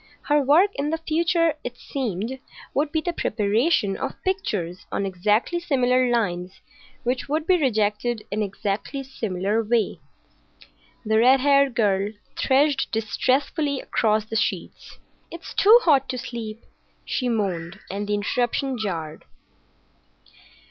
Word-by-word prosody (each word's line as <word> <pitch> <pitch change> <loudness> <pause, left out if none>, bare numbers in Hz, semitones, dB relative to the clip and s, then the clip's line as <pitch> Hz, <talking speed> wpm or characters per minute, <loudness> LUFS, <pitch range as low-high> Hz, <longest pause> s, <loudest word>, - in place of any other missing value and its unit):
Her 295 0 +3
work 315 +9 +4
in 285 +1 -2
the 325 - 0
future, 330 +1 +1
it 245 0 -6
seemed, 245 -1 -4 0.3
would 290 +1 0
be 315 - 0
the 350 +2 -2
preparation 215 - +1
of - - -5
pictures 210 - -2
on 200 - -1
exactly 210 - +1
similar 255 -6 +2
lines 185 -6 -1 0.4
which 250 +2 -2
would 310 +2 0
be 360 -1 +3
rejected 220 -2 0
in 215 - -1
exactly 205 +6 -3
the 265 - -17
same 220 -7 -4
way——The 220 0 -3
red 255 +3 +5
haired 280 -2 +4
girl 205 -2 +1 0.2
threshed 275 +1 +2
distressfully 265 +6 0
across 215 -1 +1
the 225 - -6
sheets. 220 - -3 0.3
"It's 335 0 -9
too 430 +4 +7
hot 275 -5 +3
to 255 - -2
sleep," 230 -3 -6 0.4
she 250 -2 -1
moaned; 190 -5 -2
and 205 +1 -4
the 210 - +1
interruption 245 +5 -1
jarred. 165 -7 -4
240 Hz, 130 wpm, -24 LUFS, 210-280 Hz, 0.4 s, too